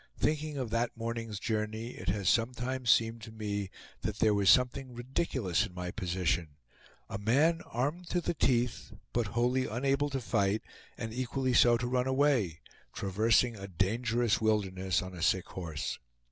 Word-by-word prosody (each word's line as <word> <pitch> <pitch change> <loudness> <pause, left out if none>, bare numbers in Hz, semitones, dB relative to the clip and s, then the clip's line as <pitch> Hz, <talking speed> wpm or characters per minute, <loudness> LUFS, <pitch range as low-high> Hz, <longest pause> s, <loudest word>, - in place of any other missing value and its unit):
Thinking 155 -1 0
of 125 -5 -3
that 115 +1 -1
morning's 115 -2 -4
journey, 110 +1 -2
it 95 -7 -5
has 100 0 -1
sometimes 125 +2 +1
seemed 115 0 +3
to 110 - -9
me 105 -3 -3 0.3
that 105 -1 -3
there 110 -2 +4
was 100 -2 +3
something 125 +3 +3
ridiculous 120 - 0
in 90 - -16
my 90 -1 -4
position; 90 -4 -1 0.5
a 100 - -5
man, 145 +11 +3
armed 150 +9 -2
to 180 - +1
the 175 - -1
teeth, 125 -6 0 0.2
but 120 -3 +1
wholly 125 +2 +2
unable 135 +5 0
to 135 -1 -2
fight, 100 -2 0 0.3
and 110 -2 -5
equally 130 +1 -1
so 120 0 +6
to 120 - -3
run 125 +1 0
away, 130 - +2 0.3
traversing 110 +4 +2
a 100 -1 -7
dangerous 115 +5 +1
wilderness, 95 -4 +1
on 95 0 -8
a 90 - -8
sick 95 0 +2
horse. 80 -5 -4
115 Hz, 160 wpm, -31 LUFS, 100-125 Hz, 0.5 s, so